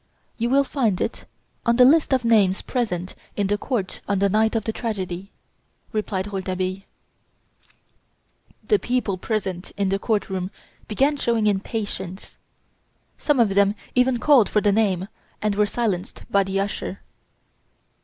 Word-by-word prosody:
"You 235 +1 +1
will 275 +2 +4
find 235 -9 0
it - - -3 0.4
on 235 -1 +3
the 250 +1 +7
list 300 +4 +5
of 260 -3 +2
names 205 -5 +3
present 185 -8 -2 0.2
in 205 - 0
the 205 +2 +1
court 215 -9 -3
on 200 - +1
the 200 +1 +2
night 220 +3 +2
of 225 - +1
the 220 - -2
tragedy," 195 -5 -4 0.6
replied 205 -3 -2
Rouletabille. 185 0 -2 1.8
The 420 - +3
people 230 - -1
present 190 -4 -3
in 200 -1 +1
the 195 +1 0
court 215 0 0
room 185 -1 -3 0.4
began 275 +7 +2
showing 230 -5 +1
impatience. 200 -2 -3 0.8
Some 295 -4 +2
of 230 -3 +5
them 200 +1 +3 0.2
even 250 0 +3
called 255 -3 +5
for 210 - +3
the 205 -1 +3
name, 195 -3 +1 0.3
and 210 -1 0
were 210 +1 +2
silenced 205 -5 -2
by 200 -1 +4
the 195 0 -1
usher. 200 +1 -3
210 Hz, 150 wpm, -23 LUFS, 190-235 Hz, 1.8 s, the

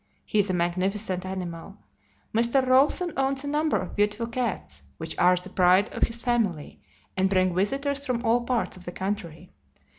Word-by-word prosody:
He 215 - 0
is 205 0 +2
a - - 0
magnificent 185 +2 -1
animal. 185 +1 -6 0.6
Mr. 235 +4 +2
Rawson 280 +7 +3
owns 270 0 0
a - - -5
number 300 +1 +1
of - - -5
beautiful 210 +2 0
cats, 230 - -4 0.2
which - - -5
are 180 +1 +5
the 180 +1 -5
pride 185 +3 +4
of - - +1
his 230 0 -7
family, 215 -11 -1 0.3
and 190 0 +2
bring 185 -2 +2
visitors 275 +9 0
from 250 -3 -2
all 235 +2 +3
parts 240 0 -1
of 185 - -12
the 175 - -5
country. 190 -4 -5
205 Hz, 175 wpm, -26 LUFS, 185-250 Hz, 0.6 s, are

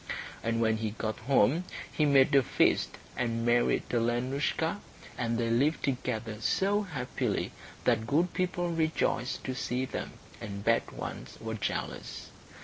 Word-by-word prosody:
And 115 0 0
when 110 -1 +3
he 110 0 -1
got 110 0 -2
home 135 - +3 0.3
he 155 - +2
made 140 -2 +5
a 140 - +7
feast - - +2 0.2
and 115 -1 -1
married 120 0 +3
Alenoushka, 130 - 0 0.4
and 115 -1 -1
they 115 -1 0
lived 140 +7 +2
together 120 -4 -2
so 200 - +2
happily 145 -11 -2 0.3
that 115 -2 +2
good 165 +6 +2
people 175 -1 0
rejoiced 160 -5 0
to 130 - -2
see 125 0 -1
them, - - -5 0.3
and 100 -2 -5
bad 115 0 +3
ones - - -7
were 110 0 -4
jealous. 110 -1 -4
125 Hz, 140 wpm, -30 LUFS, 115-150 Hz, 0.4 s, a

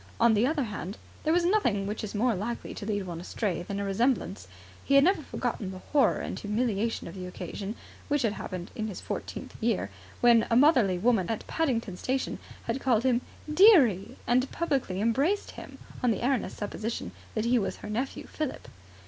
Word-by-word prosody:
On 235 -1 +5
the 220 +4 +3
other 300 -1 +1
hand, 205 -2 -5 0.3
there 315 +2 +3
is 350 -1 +3
nothing 245 - +2
which 210 +2 -4
is 215 0 -5
more 235 +3 +2
likely 220 +5 -4
to 205 - -7
lead 205 -3 -1
one 170 -2 -6
astray 185 0 -2
than 200 +3 -4
a - - -1
resemblance. 195 - 0 0.4
He 275 - +2
had 275 - +8
never 375 +1 +3
forgotten 240 -7 -3
the 190 - -7
horror 290 -2 +3
and - - -4
humiliation 220 +1 -1
of 170 - -8
the 185 -1 -6
occasion, 195 +3 -6 0.3
which 290 -2 +1
had 220 -3 +1
happened 185 -3 -6
in 220 -1 -2
his 205 - -6
fourteenth - - -6
year, 95 +2 0 0.3
when 235 -2 +5
a 230 - +3
motherly 245 - +5
woman 215 -2 +2
at 225 - -3
Paddington 235 - -1
Station 260 +5 -2 0.2
had - - -2
called 235 -4 +2
him 250 -2 +3 0.3
"dearie" 305 - +5
and 255 +2 +2
publicly 275 - -1
embraced 275 - +1
him, - - -10 0.2
on 250 - +3
the 230 +1 0
erroneous 265 -1 0
supposition 215 +2 -4 0.2
that 220 0 0
he 240 +1 +4
was 195 - -2
her 210 - -8
nephew, 250 +5 -3
Philip. 305 -4 -5
230 Hz, 190 wpm, -28 LUFS, 200-265 Hz, 0.4 s, had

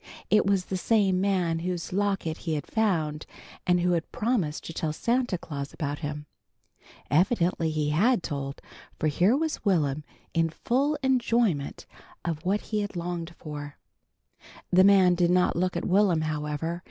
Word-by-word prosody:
It 210 -2 +4
was 195 -2 +2
the 190 - -3
same 195 -2 +2
man 180 -4 +1
whose 175 0 -4
locket 195 -5 0
he 160 -3 -3
had 145 - -3
found, 160 -9 0 0.4
and 180 0 +3
who 180 +1 +2
had 170 -2 -1
promised 210 -10 -1
to 165 - -7
tell 160 -1 -2
Santa 240 +2 0
Claus 140 -4 -6
about 145 -1 -3
him. 150 -1 -5 0.9
Evidently 175 0 +2
he 155 -1 -1
had 210 +6 +3
told, 140 -1 -5 0.3
for - - -2
here 185 - +3
was 315 0 -2
Will'm 155 -7 +1 0.3
in 165 0 +2
full 275 - 0
enjoyment 235 - +1 0.4
of 165 -2 -3
what 195 +3 +1
he 215 -1 -2
had 205 -2 -5
longed 170 -1 -4
for. 145 -2 -7 0.9
The 185 +1 +6
man 190 -2 +6
did 175 -1 +2
not 180 0 +3
look 180 0 0
at - - -3
Will'm, 185 -4 +3
however. 155 +2 -2
175 Hz, 160 wpm, -27 LUFS, 155-200 Hz, 0.9 s, The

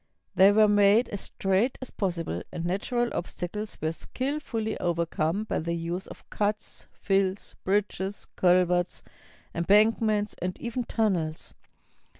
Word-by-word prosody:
They 195 +2 +7
were 215 +1 +5
made 205 +3 +4
as 205 - -4
straight 195 +6 0
as 260 - -8
possible, 170 - -2
and 170 - -4
natural 235 +7 0
obstacles 185 +4 -4
were 160 +1 -1
skillfully 255 - -3
overcome 170 +2 0
by 220 - -2
the 170 +1 -2
use 170 +3 -4
of - - -12
cuts, 210 0 -3
fills, 195 0 -1
bridges, 200 0 -1
culverts, 180 0 +2 0.5
embankments, 210 +3 +3
and 180 +1 -3
even 240 +1 -3
tunnels. 180 -10 -1
195 Hz, 125 wpm, -27 LUFS, 175-215 Hz, 0.5 s, They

